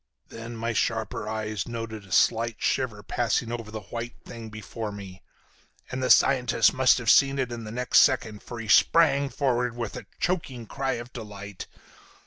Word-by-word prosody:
"Then 115 Hz, +1 st, -8 dB
my 115 Hz, +1 st, -2 dB
sharper 110 Hz, -1 st, -1 dB
eyes 110 Hz, -1 st, -3 dB
noted 115 Hz, -3 st, -6 dB
a -, -, -17 dB
slight 115 Hz, 0 st, +2 dB
shiver 115 Hz, -6 st, -1 dB
passing 115 Hz, +1 st, -1 dB
over 115 Hz, -2 st, -5 dB
the 110 Hz, 0 st, -6 dB
white 120 Hz, +1 st, -5 dB
thing 115 Hz, -1 st, -9 dB
before 110 Hz, +1 st, -6 dB
me, 95 Hz, -2 st, -10 dB, 0.7 s
and 130 Hz, +1 st, -3 dB
the 130 Hz, -, 0 dB
scientist 125 Hz, -4 st, +4 dB
must 130 Hz, -1 st, +4 dB
have 120 Hz, -, -6 dB
seen 135 Hz, 0 st, +5 dB
it 130 Hz, -3 st, -1 dB
in 115 Hz, -1 st, -6 dB
the 105 Hz, -, -7 dB
next 125 Hz, +2 st, +3 dB
second, 110 Hz, -3 st, +2 dB
for 120 Hz, -, -8 dB
he 115 Hz, -, -6 dB
sprang 140 Hz, +4 st, +4 dB
forward 125 Hz, -4 st, 0 dB
with 115 Hz, -3 st, -5 dB
a -, -, -8 dB
choking 135 Hz, -10 st, -2 dB
cry 135 Hz, +4 st, -2 dB
of 120 Hz, +1 st, -7 dB
delight. 105 Hz, -4 st, -8 dB
115 Hz, 175 wpm, -26 LUFS, 110-125 Hz, 0.7 s, seen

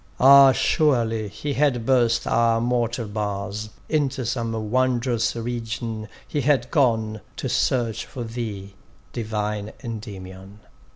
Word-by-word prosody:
Ah! 135 Hz, +1 st, +9 dB
surely 115 Hz, -7 st, +1 dB
he 140 Hz, +8 st, -4 dB
had 130 Hz, -5 st, +1 dB
burst 120 Hz, -3 st, +2 dB
our 115 Hz, 0 st, +2 dB
mortal 120 Hz, -1 st, -1 dB
bars; 105 Hz, 0 st, -4 dB, 0.2 s
Into 140 Hz, -4 st, 0 dB
some 115 Hz, -1 st, -2 dB, 0.2 s
wond'rous 125 Hz, -2 st, +1 dB
region 115 Hz, -2 st, -4 dB, 0.2 s
he 145 Hz, -, -1 dB
had 140 Hz, 0 st, +1 dB
gone, 110 Hz, -7 st, +1 dB, 0.2 s
To -, -, -3 dB
search 120 Hz, -4 st, 0 dB
for 125 Hz, -4 st, -6 dB
thee, 110 Hz, -4 st, -6 dB, 0.4 s
divine 105 Hz, -2 st, -3 dB
Endymion! 100 Hz, -3 st, -8 dB
115 Hz, 115 wpm, -23 LUFS, 110-125 Hz, 0.4 s, Ah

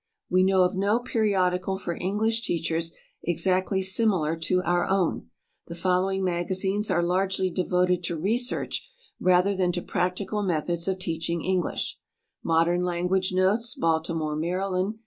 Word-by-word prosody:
We 185 Hz, +1 st, +4 dB
know 190 Hz, -1 st, +4 dB
of 180 Hz, -, +1 dB
no 200 Hz, +4 st, +2 dB
periodical 190 Hz, -5 st, 0 dB
for 175 Hz, -3 st, -4 dB
English 220 Hz, +6 st, 0 dB
teachers 165 Hz, -3 st, -1 dB, 0.3 s
exactly 185 Hz, +3 st, 0 dB
similar 190 Hz, -5 st, +2 dB
to 180 Hz, +3 st, 0 dB
our 175 Hz, 0 st, +1 dB
own. 190 Hz, -, 0 dB, 0.4 s
The 170 Hz, -, -7 dB
following 185 Hz, +2 st, 0 dB
magazines 190 Hz, +3 st, -1 dB
are 175 Hz, -, +2 dB
largely 185 Hz, +1 st, 0 dB
devoted 180 Hz, 0 st, +1 dB
to 170 Hz, -1 st, -2 dB
research 230 Hz, -, -1 dB, 0.3 s
rather 185 Hz, +2 st, +3 dB
than 185 Hz, -2 st, +1 dB
to 175 Hz, -, -2 dB
practical 185 Hz, +4 st, -1 dB
methods 170 Hz, -2 st, -1 dB
of 190 Hz, -1 st, 0 dB
teaching 170 Hz, -2 st, -2 dB
English: 185 Hz, -2 st, -1 dB, 0.4 s
"Modern 165 Hz, +2 st, +2 dB
Language 180 Hz, +1 st, 0 dB
Notes," 205 Hz, +6 st, +1 dB
Baltimore, 160 Hz, -1 st, 0 dB
Md. 185 Hz, +5 st, -1 dB
185 Hz, 135 wpm, -26 LUFS, 170-190 Hz, 0.4 s, We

